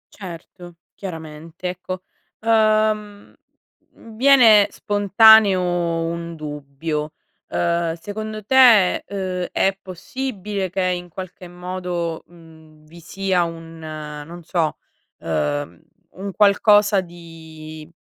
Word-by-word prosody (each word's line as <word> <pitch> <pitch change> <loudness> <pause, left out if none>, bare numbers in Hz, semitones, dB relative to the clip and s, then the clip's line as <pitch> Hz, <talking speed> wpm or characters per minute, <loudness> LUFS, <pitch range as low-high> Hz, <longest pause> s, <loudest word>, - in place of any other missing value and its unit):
Certo. 175 -2 -10 0.2
Chiaramente, 165 -1 -8
ecco. 185 +1 -6 0.4
Uhm, 215 -2 +1 0.6
mhmm, 225 -1 -15
viene 230 -5 +6
spontaneo 205 0 +5 0.5
un 170 0 -5
dubbio: 150 0 -5 0.3
uhm, 170 -1 -1
secondo 215 +4 -7
te, 235 -7 +5
uhm, 185 -2 -3
è 195 0 +1
possibile 205 - -5
che 190 +2 -2
in 180 -1 -2
qualche 185 +1 -9
modo, 175 -2 -4
mhmm, 160 -2 -18
vi 170 +3 -15
sia 190 +1 -1
un, 165 -1 -8
non 155 +1 -8
so, 165 -2 -1 0.4
uhm, 75 +1 -3 0.3
un 195 +1 -6
qualcosa 205 0 +4
di 160 -3 -12
180 Hz, 95 wpm, -21 LUFS, 165-205 Hz, 0.6 s, viene